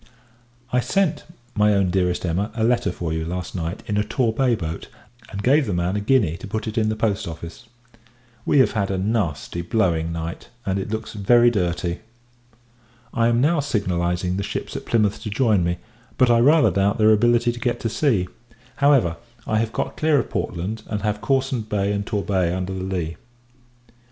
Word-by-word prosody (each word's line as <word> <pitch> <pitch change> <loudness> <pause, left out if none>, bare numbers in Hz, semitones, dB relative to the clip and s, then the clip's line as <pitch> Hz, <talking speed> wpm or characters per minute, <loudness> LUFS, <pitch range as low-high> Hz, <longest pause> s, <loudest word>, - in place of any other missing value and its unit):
I 125 - +4
sent, 175 +7 0 0.3
my 105 -1 +3
own 95 -2 +2
Dearest 90 -1 0
Emma, 90 +5 -1
a 110 - -1
letter 120 -4 +2
for 85 -2 -4
you, 80 0 -2
last 90 +2 -4
night, 85 +2 -4
in 105 - -1
a 105 - +2
Torbay 120 +2 +1
boat, 80 -5 -5 0.4
and 100 +1 -6
gave 140 +1 +4
the 100 - -1
man 85 +2 0
a - - 0
guinea 105 -7 +2
to 100 - -9
put 110 +2 -3
it 110 - -4
in 110 -1 +2
the 110 - -1
Post 110 -4 -1
Office. 85 +6 -8 0.8
We - - +2
have 130 - +5
had 100 -3 -1
a 95 - -1
nasty 95 -5 -1
blowing 85 -3 0
night, 85 0 -5 0.2
and 95 0 0
it 95 - -4
looks 110 0 -4
very 120 +4 +4
dirty. 85 -4 -1 1.1
I 115 0 +2
am 120 0 +2
now 155 +4 +3
signalizing 90 -8 -1
the - - -1
ships - - -5
at - - -6
Plymouth 105 -3 +1
to 110 - -5
join 105 -4 +2
me; 85 +1 0 0.4
but, 125 -2 +4
I 115 - +5
rather 145 +6 +5
doubt 100 +1 +1
their 110 0 +5
ability 120 +2 +3
to 120 - -8
get 120 -1 -1
to - - -1
sea. 110 -7 +1 0.5
However, 135 - +3 0.3
I 110 - +1
have 115 0 -1
got - - -3
clear 155 -1 +3
of 125 - -1
Portland, 100 +6 -3
and 105 -2 -3
have 105 0 -1
Cawsand 130 -5 0
Bay 100 -1 0
and 100 0 -3
Torbay 95 -5 0
under 95 0 -3
the 95 0 -4
lee. 90 -4 -3
105 Hz, 195 wpm, -22 LUFS, 90-120 Hz, 1.1 s, have